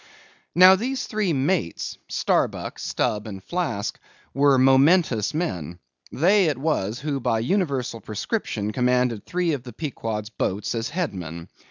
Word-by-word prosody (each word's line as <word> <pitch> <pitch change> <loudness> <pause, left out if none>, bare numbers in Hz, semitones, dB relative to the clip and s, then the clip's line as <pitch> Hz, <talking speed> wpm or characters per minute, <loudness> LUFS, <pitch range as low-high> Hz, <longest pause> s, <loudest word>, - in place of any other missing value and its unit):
Now 185 +2 +9
these 255 +6 -2
three 210 -4 -1
mates—Starbuck, 145 - -1
Stubb, 105 +1 -1
and 95 -3 -8
Flask, 160 - -3 0.3
were 140 -1 +4
momentous 135 - +4
men. 90 - -3 0.3
They 190 +6 +4
it 155 -3 0
was 125 -7 -1
who 145 -2 -2
by 115 -2 0
universal 135 - -1
prescription 105 - -3
commanded 125 -2 +1
three 175 -2 0
of 140 - -3
the 120 -2 -10
Pequod's 115 -6 -4
boats 100 -1 -2
as 115 -1 -2
headsmen. 90 - -4
130 Hz, 130 wpm, -24 LUFS, 110-170 Hz, 0.3 s, Now